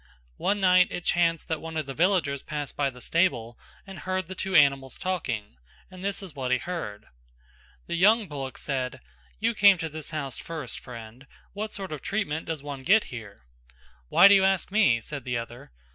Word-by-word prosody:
One 205 Hz, +1 st, 0 dB
night 185 Hz, -1 st, +5 dB
it 175 Hz, -, -6 dB
chanced 165 Hz, -2 st, +1 dB
that 160 Hz, -1 st, -2 dB
one 160 Hz, 0 st, -6 dB
of 155 Hz, -, -1 dB
the 135 Hz, -, -6 dB
villagers 165 Hz, -4 st, +1 dB
passed 150 Hz, -2 st, -5 dB
by 140 Hz, -1 st, +1 dB
the 125 Hz, -1 st, -13 dB
stable 120 Hz, -9 st, 0 dB, 0.3 s
and 195 Hz, -3 st, -9 dB
hear 185 Hz, +4 st, -1 dB
the 185 Hz, +2 st, -8 dB
two 190 Hz, +1 st, -3 dB
animals 140 Hz, -3 st, +4 dB
talking 125 Hz, -, -3 dB, 0.3 s
and 185 Hz, 0 st, -10 dB
this 200 Hz, 0 st, -2 dB
is 185 Hz, -5 st, -9 dB
what 130 Hz, -3 st, -3 dB
he 130 Hz, -, +3 dB
heard. 120 Hz, -11 st, -5 dB, 0.8 s
The -, -, -5 dB
young 205 Hz, +5 st, +4 dB
bullock 135 Hz, -4 st, -6 dB
said 130 Hz, -, -3 dB, 0.4 s
"You 230 Hz, +1 st, +1 dB
came 200 Hz, -3 st, +6 dB
to 165 Hz, -1 st, -4 dB
this 155 Hz, -1 st, -6 dB
house 140 Hz, -5 st, -4 dB
first, 155 Hz, -7 st, -5 dB
friend; 120 Hz, +2 st, -11 dB, 0.3 s
what 210 Hz, +2 st, -4 dB
sort 195 Hz, -3 st, -6 dB
of 150 Hz, -, -5 dB
treatment 190 Hz, -7 st, -2 dB
does 160 Hz, -4 st, -4 dB
one 140 Hz, -2 st, -6 dB
get 205 Hz, +10 st, +4 dB
here?" 105 Hz, -, -9 dB, 0.6 s
"Why 180 Hz, -, +8 dB
do 200 Hz, -, +7 dB
you 195 Hz, -1 st, +5 dB
ask 190 Hz, -1 st, +1 dB
me?" 170 Hz, -, +4 dB
said 140 Hz, +3 st, -6 dB
the 125 Hz, -1 st, -2 dB
other. 120 Hz, -, -8 dB
155 Hz, 195 wpm, -27 LUFS, 130-185 Hz, 0.8 s, Why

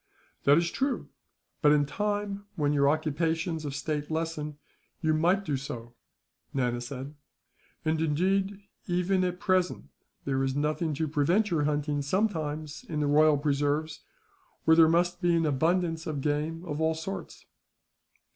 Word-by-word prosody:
"That 145 Hz, +1 st, +7 dB
is 170 Hz, 0 st, +1 dB
true; 270 Hz, 0 st, -1 dB, 0.5 s
but 150 Hz, -, +6 dB
in 145 Hz, -1 st, +4 dB
time, 205 Hz, +3 st, -2 dB
when 145 Hz, -2 st, +1 dB
your 140 Hz, -1 st, +4 dB
occupations 160 Hz, +2 st, -1 dB
of 140 Hz, -1 st, -4 dB
state 150 Hz, 0 st, -3 dB
lessen, 155 Hz, -2 st, -3 dB, 0.4 s
you 155 Hz, -2 st, +1 dB
might 180 Hz, +5 st, +2 dB
do 145 Hz, -3 st, 0 dB
so," 120 Hz, -3 st, -7 dB, 0.6 s
Nana 120 Hz, -2 st, 0 dB
said. 135 Hz, +3 st, -6 dB, 0.7 s
"And 160 Hz, 0 st, +1 dB
indeed, 190 Hz, +6 st, +1 dB, 0.3 s
even 180 Hz, +1 st, +1 dB
at 180 Hz, 0 st, -2 dB
present, 185 Hz, -, 0 dB, 0.4 s
there 135 Hz, -1 st, 0 dB
is 135 Hz, 0 st, -1 dB
nothing 150 Hz, +2 st, 0 dB
to 160 Hz, +3 st, -1 dB
prevent 170 Hz, +9 st, +2 dB
your 155 Hz, -4 st, +2 dB
hunting 145 Hz, -1 st, 0 dB
sometimes 155 Hz, -3 st, -1 dB
in 155 Hz, -2 st, -2 dB
the 150 Hz, -, +1 dB
royal 150 Hz, +1 st, +5 dB
preserves, 145 Hz, +1 st, 0 dB, 0.7 s
where 160 Hz, -, +6 dB
there 160 Hz, -1 st, +7 dB
must 175 Hz, +2 st, +1 dB
be 175 Hz, -1 st, +3 dB
an 165 Hz, -1 st, +2 dB
abundance 165 Hz, +3 st, +1 dB
of 150 Hz, -3 st, -2 dB
game 155 Hz, +4 st, -1 dB
of 150 Hz, -2 st, -3 dB
all 160 Hz, 0 st, +2 dB
sorts." 165 Hz, +5 st, -6 dB
155 Hz, 150 wpm, -28 LUFS, 145-175 Hz, 0.7 s, That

